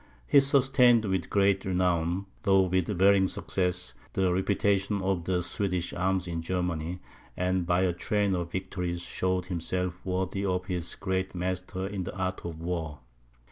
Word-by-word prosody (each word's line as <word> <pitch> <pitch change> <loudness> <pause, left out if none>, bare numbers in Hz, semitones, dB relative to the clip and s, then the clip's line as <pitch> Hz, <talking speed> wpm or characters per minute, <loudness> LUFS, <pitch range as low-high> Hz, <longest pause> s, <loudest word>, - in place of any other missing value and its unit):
He 140 - +6
sustained 130 -4 +4
with 95 -4 -1
great 100 -1 +3
renown, 90 0 0 0.2
though 95 -1 +4
with 95 -1 +1
varying 95 -1 +4
success, 90 -6 -1 0.2
the 95 -2 +2
reputation 100 +1 +1
of 95 -3 0
the 90 -1 0
Swedish 90 -1 -2
arms 95 0 0
in 85 -1 -3
Germany, 90 -1 -2 0.4
and 90 -1 0
by 90 +1 +3
a 90 -2 +2
train 105 +2 0
of 85 -2 -2
victories 90 -2 -3
showed 90 +1 -1
himself 90 0 -3
worthy 95 +1 -2
of 90 -2 -1
his 90 -3 -3
great 95 -1 -2
master 95 +1 -3
in 100 -1 -3
the 95 - -6
art 95 0 -2
of 80 -2 -6
war. 80 -4 -4
95 Hz, 155 wpm, -28 LUFS, 90-95 Hz, 0.4 s, He